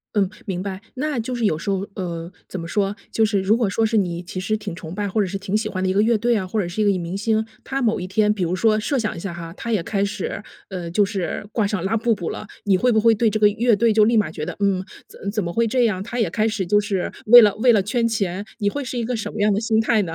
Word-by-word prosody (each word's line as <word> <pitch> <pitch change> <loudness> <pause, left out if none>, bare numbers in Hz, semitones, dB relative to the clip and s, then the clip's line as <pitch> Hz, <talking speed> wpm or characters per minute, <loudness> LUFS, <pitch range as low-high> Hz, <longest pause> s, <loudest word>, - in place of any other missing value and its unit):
嗯， 195 -3 +2 0.2
明 185 -2 -3
白。 190 -1 -5 0.2
那 290 -1 -2
就 250 +3 -3
是 235 - -3
有 155 -6 +2
时 195 +5 -5
候 195 +1 -1
呃， 170 -2 -5 0.2
怎 185 - -6
么 165 - -6
说， 200 +1 0 0.2
就 220 - +3
是 205 -3 +1
如 205 +4 +3
果 230 -4 +1
说 225 +3 0
是 220 0 +1
你 175 -3 0
其 185 +2 -6
实 215 +3 -1
挺 210 -5 -6
崇 165 -2 -8
拜 205 +1 -2
或 215 - -1
者 - - +1
是 195 +2 -3
挺 200 +1 -3
喜 215 0 -2
欢 185 -3 -3
的 185 - +1
一 - - +1
个 205 - +3
乐 230 +1 +3
队 235 +2 +1
啊， 190 - -2
或 210 +4 -2
者 175 - -3
是 175 +5 -6
一 - - +1
个 195 -3 +2
明 175 +3 -4
星， 220 +1 +1 0.2
他 270 0 -3
某 225 -4 +1
一 180 - -4
天 210 +2 +2
比 190 -4 -2
如 175 +2 0
说 215 +2 +3
设 270 +5 -1
想 215 -5 -2
一 - - -6
下 190 -1 -5
哈， 165 -1 -7
他 230 - -4
也 205 -6 +2
开 200 +1 -1
始， 200 0 -4 0.3
呃， 180 -3 -5
就 205 +3 +3
是 195 -2 -3
挂 220 -3 +1
上 200 -4 -2
拉 225 +4 +1
布 230 +1 +2
布 175 -6 -4
了， - - -6 0.2
你 195 -2 +4
会 250 +4 +2
不 220 - +3
会 230 +1 +5
对 230 +2 +2
这 215 +1 -1
个 210 - +6
乐 225 +2 +2
队 230 +2 +3
就 215 0 +5
立 230 +1 +3
马 210 -7 +2
觉 155 -2 -5
得， - - -5
嗯， 195 -2 +1 0.2
怎 200 - -6
怎 210 -3 -1
么 170 - -3
会 230 +6 +1
这 245 +1 +2
样？ 190 -4 0
他 245 +4 -5
也 215 -7 +2
开 215 +5 +1
始 215 -3 -1
就 205 +2 +4
是 200 -3 -2
为 240 +2 +10
了 205 -2 +4
为 245 +2 +5
了 210 -3 +4
圈 230 +4 0
钱。 200 -4 -2 0.2
你 205 - +2
会 285 +7 -4
是 250 0 -5
一 235 - -1
个 245 +1 -2
什 220 - -4
么 210 - -3
样 210 - +4
的 205 - +1
心 220 -1 +1
态 220 -1 +2
呢？ 165 - -5
205 Hz, 340 characters per minute, -22 LUFS, 190-225 Hz, 0.3 s, 为